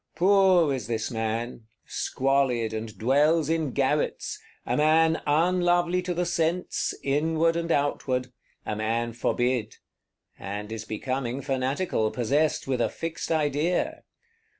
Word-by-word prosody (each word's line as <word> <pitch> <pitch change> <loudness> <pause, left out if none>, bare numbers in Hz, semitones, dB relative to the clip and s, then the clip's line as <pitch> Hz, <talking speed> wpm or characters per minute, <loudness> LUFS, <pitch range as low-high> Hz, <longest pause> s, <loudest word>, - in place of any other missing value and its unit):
Poor 185 -5 +4
is 130 - -4
this 115 +1 -2
man; 115 0 -3 0.2
squalid, 130 -4 0
and 110 -1 -5
dwells 145 - +3
in 160 -3 0
garrets; 140 +3 -1 0.2
a 120 - 0
man 160 +3 +3
unlovely 175 +3 +2
to 180 -1 -3
the 180 +1 0
sense, 175 0 0
outward 160 +4 +2
and 170 0 -2
inward; 130 -4 0 0.3
a 105 - -2
man 115 +2 -1
forbid;—and 110 -4 -4
is 110 -1 -5
becoming 130 +3 -3
fanatical, 135 -2 -1
possessed 140 +7 0
with 125 -3 0
fixed 165 0 -5
idea. 155 +2 0
140 Hz, 115 wpm, -26 LUFS, 120-165 Hz, 0.3 s, Poor